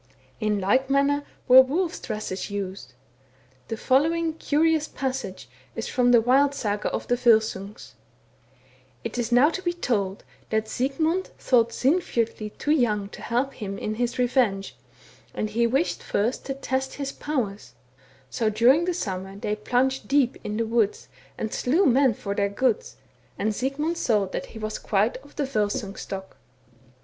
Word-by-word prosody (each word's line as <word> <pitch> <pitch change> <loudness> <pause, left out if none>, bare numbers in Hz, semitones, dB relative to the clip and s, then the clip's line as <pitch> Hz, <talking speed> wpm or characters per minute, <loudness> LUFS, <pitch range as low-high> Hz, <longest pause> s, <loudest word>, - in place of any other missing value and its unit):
In 210 -2 0
like 255 +8 +2
manner 280 +1 +2 0.2
were 255 +1 +10
wolves' 320 +7 -1
dresses 210 -2 -4
used. 190 -10 -5 0.7
The 225 - -4
following 320 +7 +2
curious 315 0 +1
passage 255 - -4 0.3
is - - -4
from 245 -1 +2
the 240 -2 +6
wild 275 +4 +3
Saga 210 -4 -1
of - - -3
the - - +2
Volsungs: 220 -4 +1 0.4
— - - -34
" - - -33
It - - -4
is 240 0 -2
now 255 +6 +5
to 375 - -4
be 345 -1 -1
told 205 - -1 0.3
that 220 0 0
Sigmund 315 +10 0
thought 235 -3 +3
Sinfjotli 235 -8 0
too 295 - -1
young 215 -9 +1
to - - -11
help 250 +4 -1
him 195 -3 -5
in 215 - -3
his 240 +2 -2
revenge, 240 -6 +1 0.6
and 215 - -2
he 235 +2 +2
wished 270 +8 0
first 225 +5 -1
to 270 - -2
test 265 0 -2
his 275 -1 -3
powers; 210 - -3 0.5
so 220 - 0
during 245 +10 +4
the 360 -1 -1
summer 190 - -4
they 210 +1 -2
plunged 255 +5 0
deep 275 -3 +3
into 210 +2 -1
the 220 - -5
wood 225 -3 +2 0.4
and 220 - -3
slew 325 +10 +2
men 260 -3 +4
for 200 -1 -4
their 200 0 0
goods, 235 +3 0 0.4
and 215 +1 0
Sigmund 295 +8 -2
saw 210 -8 +2
that 190 - -5
he - - -12
was 215 0 -4
quite 210 +3 +1
of 285 +2 -18
the 290 - -1
Volsung 210 -4 -1
stock. 190 -1 -7
245 Hz, 165 wpm, -25 LUFS, 210-275 Hz, 0.7 s, were